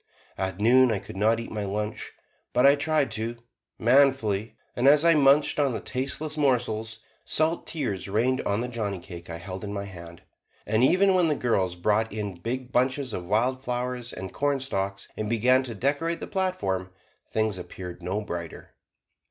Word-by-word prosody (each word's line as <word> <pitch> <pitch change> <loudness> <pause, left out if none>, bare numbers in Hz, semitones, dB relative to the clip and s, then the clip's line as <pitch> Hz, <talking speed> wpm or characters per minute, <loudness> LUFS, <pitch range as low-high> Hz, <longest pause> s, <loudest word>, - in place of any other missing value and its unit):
At 95 0 -3
noon 125 +3 +5
I 110 - +1
could 95 - -9
not 110 +3 +2
eat 115 - -7
my 105 -1 -3
lunch, 105 +2 -4 0.4
but 125 +2 +4
I 140 - +8
tried 150 0 +1
to, 115 +2 -3 0.4
manfully, 120 -4 +3 0.2
and 125 +2 +2
as 150 +3 +6
I 170 - +7
munched 145 0 +4
on 140 -3 +2
the - - -2
tasteless 140 +4 -3
morsels, 115 -6 0 0.2
salt 160 +2 0
tears 115 - -3
rained 120 +6 +1
on 100 +2 -1
the 125 - -2
johnnycake 100 -7 -5
I 85 - -5
held 95 +3 -7
in 100 - -4
my 100 -1 -4
hand. 85 -3 -11 0.4
And 110 +3 +2
even 190 +8 +5
when 180 -2 +3
the 150 - +1
girls 95 -9 0
brought 105 +5 +1
in 105 -2 -4
big 125 +6 -4
bunches 130 0 0
of 90 - -4
wild 125 +7 +1
flowers 125 -1 -3
and 95 -1 -7
cornstalks, 130 -9 -1
and 105 -1 -3
began 125 +3 +4
to 120 -3 -6
decorate 145 +8 0
the - - -5
platform, 100 - -1 0.4
things 110 -3 0
appeared 90 0 -8
no 95 +4 -2
brighter. 85 -5 -7
115 Hz, 175 wpm, -26 LUFS, 100-135 Hz, 0.4 s, I